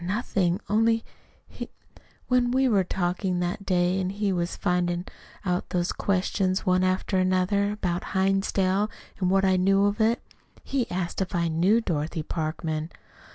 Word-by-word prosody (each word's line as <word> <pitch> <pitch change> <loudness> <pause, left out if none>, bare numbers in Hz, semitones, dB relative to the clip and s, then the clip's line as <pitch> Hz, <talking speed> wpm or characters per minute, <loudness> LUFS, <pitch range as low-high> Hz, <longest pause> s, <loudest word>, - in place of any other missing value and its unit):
"Nothing, 185 -2 0
only 225 +2 +2 0.4
he - - -8 0.6
When 250 -1 +3
we 260 +2 +3
were 205 -6 +3
talking 180 0 -1
that 180 +3 -3
day, 180 0 +2
and 185 0 -1
he 200 -1 -1
was 175 0 -2
flinging 175 0 0 0.4
out 180 -1 -1
those 175 -1 0
questions 190 0 0
one 185 0 +3
after 185 +1 +1
another, 185 +2 +2
about 180 -3 -3
Hinsdale, 195 +1 +2 0.3
and 185 -2 +1
what 195 +1 +3
I 190 -1 +3
knew 195 +2 +3
of 205 +2 0
it, 225 +2 +3 0.4
he 265 -3 -1
he - - -26
asked 180 +1 -2
if 190 0 -2
I 170 -1 +1
knew 185 +8 +3
Dorothy 160 -4 -2
Parkman." 155 0 -3
185 Hz, 155 wpm, -26 LUFS, 175-200 Hz, 0.6 s, When